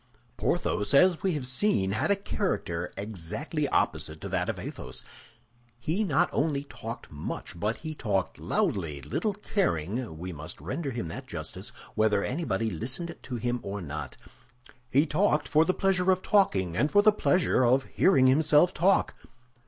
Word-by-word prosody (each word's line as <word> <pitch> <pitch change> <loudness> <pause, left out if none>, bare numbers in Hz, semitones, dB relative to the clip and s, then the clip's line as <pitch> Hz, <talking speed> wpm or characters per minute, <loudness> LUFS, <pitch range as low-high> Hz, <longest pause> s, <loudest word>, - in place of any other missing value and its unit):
Porthos, 105 +6 0
as 180 +3 +5
we 190 -2 +1
have 145 -4 -3
seen, 125 - +2
had 110 - 0
a 200 - +5
character 100 - -2
exactly 110 - -3
opposite 80 0 0
to - - -5
that - - -1
of - - -2
Athos. 65 0 -6 0.7
He 160 - -1
not 155 -10 +2
only 140 -1 0
talked 115 -4 -8
much, 75 +3 -6
but 105 +4 -1
he 155 -1 -5
talked 100 - -2
loudly, 75 -8 -1
little 200 - -1
caring, 115 - -1
we 90 +2 -6
must 75 0 -8
render 135 - -3
him 120 -9 -4
that - - -7
justice, - - -6 0.2
whether 110 -2 +2
anybody 115 - -1
listened 130 - -3
to 130 - -6
him 120 +1 -1
or 100 +1 -5
not. 75 -3 -6 0.7
He 140 +4 +4
talked 155 -3 +1
for 155 +3 +4
the 185 - +3
pleasure 190 -1 +2
of 185 0 0
talking 95 - +2
and 145 - +2
for 205 0 +5
the 215 - +7
pleasure 180 -9 +2
of 130 +2 +4
hearing 160 -5 +3
himself 150 +5 +5
talk. 190 +5 +3
130 Hz, 160 wpm, -28 LUFS, -, 0.7 s, the